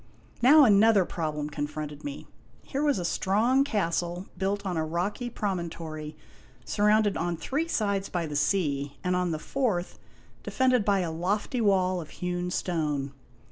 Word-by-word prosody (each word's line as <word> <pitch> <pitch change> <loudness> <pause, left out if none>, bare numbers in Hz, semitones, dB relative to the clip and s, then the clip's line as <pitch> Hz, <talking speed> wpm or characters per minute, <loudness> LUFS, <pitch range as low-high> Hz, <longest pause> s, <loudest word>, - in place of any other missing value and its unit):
Now 290 +5 +8
another 210 -3 +5
problem 155 -4 -3
confronted 150 0 -5
me. 285 0 -6 0.4
Here 275 - -3
was 295 -4 +2
a 175 - -3
strong 220 +10 +2
cas 200 -11 0
tle 175 +1 -5
built 195 +2 -2
on 185 -2 -2
a 160 - 0
rocky 180 +9 -2
promontory 165 -7 -4 0.5
surrounded 210 0 +2
on 170 0 -1
three 280 - -2
sides 200 -9 -1
by 175 -2 -2
the 150 -2 -5
sea, 145 -3 0
and 180 0 +1
on 180 -1 0
the 160 - -1
fourth 200 - -2 0.4
defended 255 -3 +2
by 200 -1 +2
a 170 -2 -2
lofty 200 +9 -1
wall 185 -3 +2
of 155 - -10
hewn 180 0 -3
stone. 150 -6 -2
180 Hz, 155 wpm, -27 LUFS, 165-210 Hz, 0.5 s, Now